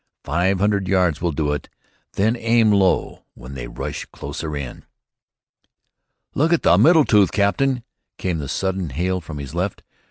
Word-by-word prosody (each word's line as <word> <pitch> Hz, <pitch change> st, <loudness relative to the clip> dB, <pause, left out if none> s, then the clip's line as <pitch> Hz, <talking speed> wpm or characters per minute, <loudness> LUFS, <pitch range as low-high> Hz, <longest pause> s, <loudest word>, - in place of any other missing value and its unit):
"Five 95 Hz, +3 st, +1 dB
hundred 100 Hz, -1 st, +1 dB
yards 90 Hz, -5 st, +1 dB
will 85 Hz, -1 st, 0 dB
do 75 Hz, -1 st, -1 dB
it. 75 Hz, -, -5 dB, 0.4 s
Then 110 Hz, +4 st, +1 dB
aim 115 Hz, -2 st, +3 dB
low 95 Hz, -3 st, +1 dB
when 65 Hz, +2 st, -10 dB
they 60 Hz, -3 st, -6 dB
rush -, -, -5 dB
closer 75 Hz, +1 st, -6 dB
in." 70 Hz, -4 st, -7 dB, 1.5 s
"Look 160 Hz, +4 st, +1 dB
at 170 Hz, -, +2 dB
the -, -, +5 dB
middle 160 Hz, -2 st, +6 dB
tooth, 105 Hz, -4 st, +4 dB
captain," 120 Hz, +5 st, +1 dB, 0.3 s
came 90 Hz, -3 st, -2 dB
the 70 Hz, -3 st, -5 dB
sudden 95 Hz, 0 st, -2 dB
hail 90 Hz, +7 st, -1 dB
from 75 Hz, -2 st, -8 dB
his 70 Hz, -1 st, -7 dB
left. 90 Hz, +3 st, -3 dB
95 Hz, 160 wpm, -21 LUFS, 75-105 Hz, 1.5 s, middle